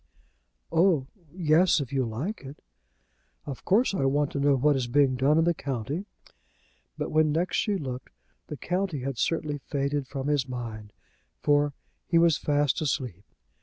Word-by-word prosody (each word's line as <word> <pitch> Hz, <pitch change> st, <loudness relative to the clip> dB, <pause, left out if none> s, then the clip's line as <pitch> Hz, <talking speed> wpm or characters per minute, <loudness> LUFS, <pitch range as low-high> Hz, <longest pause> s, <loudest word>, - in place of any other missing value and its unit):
"Oh! 165 Hz, -6 st, +3 dB, 0.3 s
yes, 170 Hz, 0 st, +3 dB
if 140 Hz, -2 st, -5 dB
you 135 Hz, -1 st, +2 dB
like 135 Hz, -, -4 dB
it." 140 Hz, +1 st, -10 dB, 0.9 s
"Of 140 Hz, -3 st, -7 dB
course 215 Hz, +4 st, +3 dB
I 165 Hz, -, 0 dB
want 145 Hz, +1 st, +1 dB
to 140 Hz, -, -3 dB
know 140 Hz, 0 st, +4 dB
what 145 Hz, +3 st, +3 dB
is 130 Hz, -2 st, -1 dB
being 135 Hz, +1 st, +3 dB
done 135 Hz, +4 st, +3 dB
in 165 Hz, -, +4 dB
the 170 Hz, +1 st, +3 dB
county." 140 Hz, -, -4 dB, 0.9 s
But -, -, -3 dB
when 155 Hz, -1 st, +3 dB
next 170 Hz, +4 st, 0 dB
she 205 Hz, -2 st, +1 dB
looked, 130 Hz, -5 st, -6 dB, 0.4 s
the 150 Hz, -, -6 dB
county 180 Hz, -4 st, -2 dB
had 135 Hz, -2 st, -4 dB
certainly 150 Hz, -3 st, -1 dB
faded 140 Hz, -1 st, -2 dB
from 135 Hz, 0 st, -5 dB
his 145 Hz, -3 st, +1 dB
mind, 115 Hz, -4 st, -6 dB, 0.5 s
for 145 Hz, 0 st, +3 dB, 0.3 s
he 170 Hz, -, +3 dB
was 165 Hz, -2 st, +5 dB
fast 145 Hz, -3 st, +1 dB
asleep. 125 Hz, -, -2 dB
145 Hz, 165 wpm, -27 LUFS, 130-160 Hz, 0.9 s, was